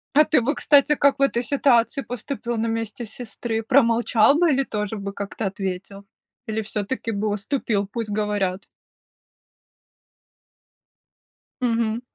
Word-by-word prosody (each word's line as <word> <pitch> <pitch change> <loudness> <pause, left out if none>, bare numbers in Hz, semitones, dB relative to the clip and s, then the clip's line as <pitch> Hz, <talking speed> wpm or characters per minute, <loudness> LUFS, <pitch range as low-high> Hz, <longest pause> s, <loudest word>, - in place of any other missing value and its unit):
А 300 - +8
ты 305 - +3
бы, 280 +6 0
кстати, 290 +1 +4
как 280 -1 +2
в - - -3
этой 250 -3 +2
ситуации 265 0 +2
поступил 245 -1 -5
на 225 0 -1
месте 225 +1 -3
сестры? 225 0 -5
Промолчал 235 0 +4
бы 345 -2 +4
или 275 -1 +2
тоже 210 -3 -3
бы 200 -1 -5
как-то 200 +2 -5
ответил? 195 +1 -5 0.4
Или 220 0 -1
всё-таки 220 +3 -3
бы 210 +1 -2
уступил, 210 0 -1
пусть 210 +1 -5
говорят? 205 -3 -1 3.0
Мгм. 230 -1 0
225 Hz, 130 wpm, -23 LUFS, 210-255 Hz, 3.0 s, А